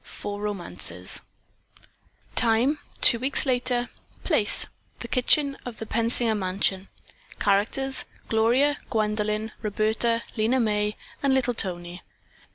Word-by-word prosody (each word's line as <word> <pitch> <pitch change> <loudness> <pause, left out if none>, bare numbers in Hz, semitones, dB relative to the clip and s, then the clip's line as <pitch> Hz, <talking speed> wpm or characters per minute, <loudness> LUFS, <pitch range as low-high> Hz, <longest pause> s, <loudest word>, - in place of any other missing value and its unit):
FOUR 205 0 -6
ROMANCES 95 - -3 1.1
Time 245 +6 +3 0.2
Two 235 - +6
weeks 265 +4 +2
later. 245 -1 +1 0.4
Place 260 - +4 0.5
Kitchen 275 +2 +2
of 245 -2 -7
the 220 - -6
Pensinger 230 0 0
mansion. 190 0 -1 0.5
Characters 220 +7 +1 0.2
Gloria, 245 +6 +3
Gwendolyn, 215 0 -1
Roberta, 220 +2 0
Lena 235 +3 +2
May 210 -2 0 0.3
and 275 -2 +3
little 250 -2 +1
Tony. 175 -4 -3
220 Hz, 100 wpm, -26 LUFS, 205-250 Hz, 1.1 s, Two